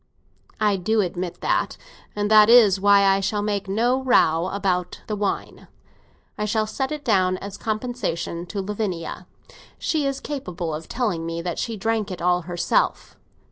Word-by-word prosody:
"I 210 -2 +2
do 215 +4 +1
admit 180 -1 -4
that, - - 0 0.4
and 205 0 -1
that 215 0 +7
is 215 -5 +7
why 200 0 +5
I 195 0 +4
shall 205 +1 -1
make 205 -1 -2
no 240 +6 +1
row 180 -9 +3
about 185 -3 -1
the 215 - -3
wine; 205 -1 -3 0.7
I 210 - 0
shall 215 +1 0
set 265 +5 -3
it 300 -1 -5
down 185 -5 +2
as 200 +1 -7
compensation 215 -7 -3
to 200 +2 -4
Lavinia. 200 -4 -4 0.5
She 300 -3 0
is 275 0 -2
capable 180 - -5
of 155 +1 -7
telling 210 -10 -1
me 165 0 -4
that 175 -1 -3
she 230 -2 -3
drank 220 0 -1
it 185 - -6
all 180 0 +2
herself. 175 0 -1
200 Hz, 165 wpm, -23 LUFS, 180-220 Hz, 0.7 s, that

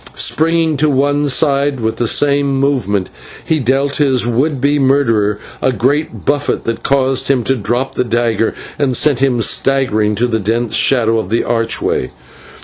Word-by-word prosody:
Springing 160 -1 +1
to 150 +2 +2
one 145 +1 +1
side, 140 0 +1
with 110 -1 -2
the 120 - 0
same 140 +1 +2
movement 105 -9 -1 0.3
he 160 - 0
dealt 135 +2 0
his 135 -5 +2
would 130 +5 0
be 145 +2 +1
murderer 115 -7 +1 0.2
a 130 - +2
great 135 +7 -2
buffet, 145 0 -1
that 115 0 -3
caused 135 -1 +1
him 130 -3 +1
to 135 - 0
drop 120 +5 -2
the 125 - -1
dagger 115 -2 -1 0.2
and 135 -4 +1
sent 145 -5 +2
him 130 -3 +1
staggering 120 -4 +1
into 110 +4 0
the 115 -2 -1
dense 115 +3 -2
shadow 115 -4 +2
of 95 - -5
the 115 - 0
archway. 115 - -1
130 Hz, 165 wpm, -15 LUFS, 115-140 Hz, 0.3 s, to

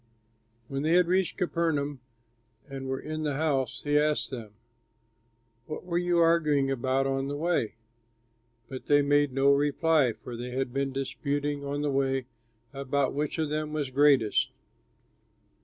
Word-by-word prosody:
When 135 +2 -3
they 155 +3 +1
had 180 0 +5
reached 185 +1 0
Capernaum 160 -6 -1 0.7
and 135 -1 -6
were 135 0 -2
in 155 0 -5
the 150 -3 -1
house, 140 -4 -1
he 145 0 +3
asked 150 -1 +1
them, 110 -5 -8 1.1
"What 155 - -6
were 175 -1 0
you 175 -1 +1
arguing 155 -5 +3
about 135 +1 0
on 135 0 -1
the 145 - -3
way?" 160 -9 0 0.9
But 130 -1 -8
they 145 0 +5
made 145 0 +3
no 135 +2 +3
reply, 145 -2 +2
for 115 +2 -9
they 120 +2 -6
had 130 0 -3
been 135 0 -1
disputing 140 +2 -2
on 145 +1 -3
the 145 - 0
way 135 -1 0 0.5
about 140 0 -1
which 145 +3 -2
of 155 -2 -1
them 155 0 -2
was 145 -4 -2
greatest. 135 -5 +3
140 Hz, 155 wpm, -28 LUFS, 135-155 Hz, 1.1 s, had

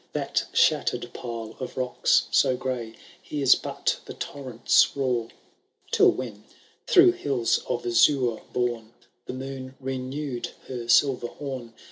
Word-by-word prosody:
That - - -1
shattered - - +2
pile 115 -2 -6
of 130 -2 -6
rocks 125 -1 +2
so 130 - +3
gray. 125 -3 -4 0.3
Hears 140 -4 +3
but - - -2
the - - -9
torrent's 130 -2 +1
roar. 125 -4 0 0.6
Till - - +6
when, 110 -5 -6 0.4
through 360 -1 +7
hills 135 - 0
of 120 -1 -2
azure 120 0 +3
borne,' 120 -2 -2 0.3
The - - -4
moon 130 0 -7
renewed 135 0 -4 0.2
her 120 -2 -6
silver 125 -1 +3
horn. 130 -4 -7
125 Hz, 125 wpm, -26 LUFS, 120-135 Hz, 0.6 s, through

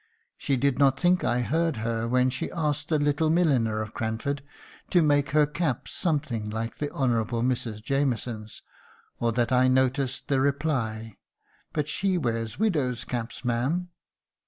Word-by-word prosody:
She 140 -2 0
did 140 +1 +1
not 135 -2 +4
think 180 0 +3
I 120 +2 +1
heard 160 +4 0
her 115 +1 -2
when 125 +1 +2
she 130 - -3
asked 150 -2 -2
the 155 - +3
little 145 +2 +1
milliner 130 -11 +2
of 110 - -9
Cranford 115 +6 -2 0.5
to 175 -2 +4
make 145 -1 +3
her 150 0 +4
caps 150 -3 -2
something 140 - -1
like 115 +1 -4
the 145 - -1
Honourable 120 -3 0
Mrs. 115 -4 -1
Jamieson's, 120 -5 -2 0.6
or 120 -1 +1
that 120 +1 0
I 130 0 +4
noticed 130 0 +1
the 135 -2 +2
reply: 130 -7 -1 0.5
"'But 150 -2 -1
she 190 +4 0
wears 115 -6 -2
widows' 150 - 0
caps, 120 +1 -5
ma'am!' 135 +10 0
130 Hz, 155 wpm, -27 LUFS, 115-150 Hz, 0.6 s, not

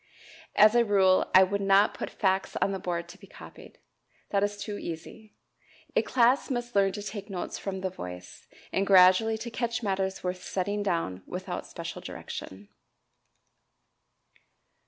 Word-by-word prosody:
As 215 +1 +7
a 240 0 +5
rule 190 -3 +3
I 190 - +9
would 200 +2 -1
not 195 +1 +4
put - - -5
facts 190 -1 0
on 195 - +1
the 195 - -3
board 170 -1 -3
to - - -13
be - - -15
copied. - - -13 0.5
That 200 - +2
is 205 0 -1
too 205 0 -5
easy. 170 +6 -8 0.6
A - - +5
class 250 +4 +2
must 240 -2 -3
learn 195 -1 +4
to 205 - -6
take 205 0 -7
notes 185 -3 -5
from 190 -1 -5
the 190 -1 -2
voice, 90 - -9 0.3
and 195 +1 +1
gradually 190 +4 +6
to 235 +2 -7
catch 235 0 -2
matters 190 -1 -2
worth 180 0 -3
setting 205 +2 -2
down 165 - -2
without - - -5
special - - -7
direction. 100 +2 -8
195 Hz, 155 wpm, -28 LUFS, 185-210 Hz, 0.6 s, I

